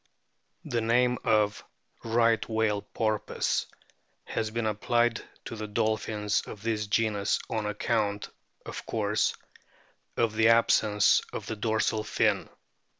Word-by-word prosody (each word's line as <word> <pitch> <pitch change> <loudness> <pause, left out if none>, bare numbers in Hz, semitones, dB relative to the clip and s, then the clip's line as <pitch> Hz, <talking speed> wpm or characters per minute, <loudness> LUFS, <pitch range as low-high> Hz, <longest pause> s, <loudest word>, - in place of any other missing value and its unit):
The 120 -1 -1
name 125 +2 +2
of 105 -1 +2 0.2
" - - -48
Right 115 -1 +2
Whale 110 -2 +1
Porpoise 110 0 -1 0.3
" - - -44
has 110 - 0
been 115 +1 -2
applied 120 +2 +1 0.2
to - - -6
the 110 -1 -5
dolphins 105 0 0
of 105 - -9
this 110 -2 -1
genus 105 -1 +1
on 110 -2 -1
account, 105 0 -1 0.4
of - - -6
course, - - 0 0.8
of 115 -2 +2
the 110 0 +4
absence 110 -2 +4
of - - -5
the 110 - -4
dorsal 110 0 0
fin. 105 - +1
110 Hz, 130 wpm, -28 LUFS, 105-115 Hz, 0.8 s, the